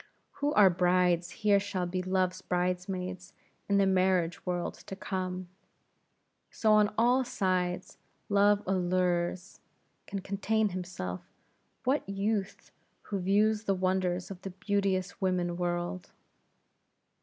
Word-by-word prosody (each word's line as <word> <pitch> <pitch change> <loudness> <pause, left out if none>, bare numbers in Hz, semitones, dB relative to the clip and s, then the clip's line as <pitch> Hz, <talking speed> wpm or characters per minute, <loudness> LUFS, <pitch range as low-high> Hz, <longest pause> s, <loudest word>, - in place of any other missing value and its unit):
Who 290 +1 +1
are 200 -6 +7
brides 180 -1 +2
here 205 +1 +2
shall 195 -2 -2
be 180 +1 -2
Love's 185 0 0
bridemaids 180 +1 -2 0.4
in 200 - +3
the 200 - +4
marriage 185 -3 +2
world 175 -1 -1
to 195 - -5
come. 185 -2 -4 1.0
So 220 - +1
on 210 0 +5
all 245 +3 +4
sides 185 -5 -1 0.3
Love 205 0 +4
allures; 180 -1 0 0.5
can 200 - -4
contain 205 +3 0
himself 175 - -6 0.5
what 265 -3 0
youth 200 0 -2 0.3
who 200 - -3
views 210 +3 +2
the 195 - +2
wonders 185 -1 0
of 190 -1 -8
the 195 - -5
beauteous 195 0 -1
woman 180 -2 0
world? 175 0 -3
185 Hz, 120 wpm, -30 LUFS, 180-200 Hz, 1.0 s, are